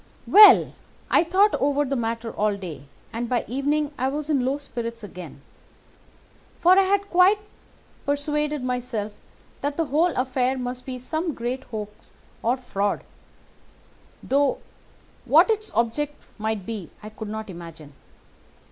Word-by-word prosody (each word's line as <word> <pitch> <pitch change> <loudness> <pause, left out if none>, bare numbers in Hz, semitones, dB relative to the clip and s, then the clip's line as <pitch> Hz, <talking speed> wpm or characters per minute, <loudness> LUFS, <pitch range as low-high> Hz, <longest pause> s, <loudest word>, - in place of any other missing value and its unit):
"Well, 415 -1 +8 0.4
I - - +5
thought 385 +5 +3
over 285 +1 +2
the 275 +1 -2
matter 230 -1 -2
all 210 -1 0
day, 160 -8 -8 0.3
and 235 +1 -3
by 245 -2 0
evening 290 +3 0
I 260 - +1
was 295 +3 -2
in 275 -4 +2
low 265 +3 0
spirits 235 -5 -6
again; 175 -7 -10 1.1
for 350 - +4
I - - +7
had 400 +1 0
quite 365 +4 +6 0.7
persuaded 295 0 -1
myself 250 -4 -3 0.5
that 285 0 -2
the 330 - +1
whole 310 +5 +2
affair 255 0 0
must 250 +1 -5
be 255 -1 -4
some 315 +5 -3
great 250 +3 -4
hoax 210 -2 -8 0.3
or 240 +3 +1
fraud, 205 -5 -2 1.2
though 280 0 +2 0.7
what - - +6
its 430 0 -2
object 285 +6 0 0.2
might 215 -3 -2
be 215 -7 -6
I 215 - -7
could 220 -1 -7
not 220 0 -5
imagine. 165 -5 -10
255 Hz, 140 wpm, -24 LUFS, 220-295 Hz, 1.2 s, Well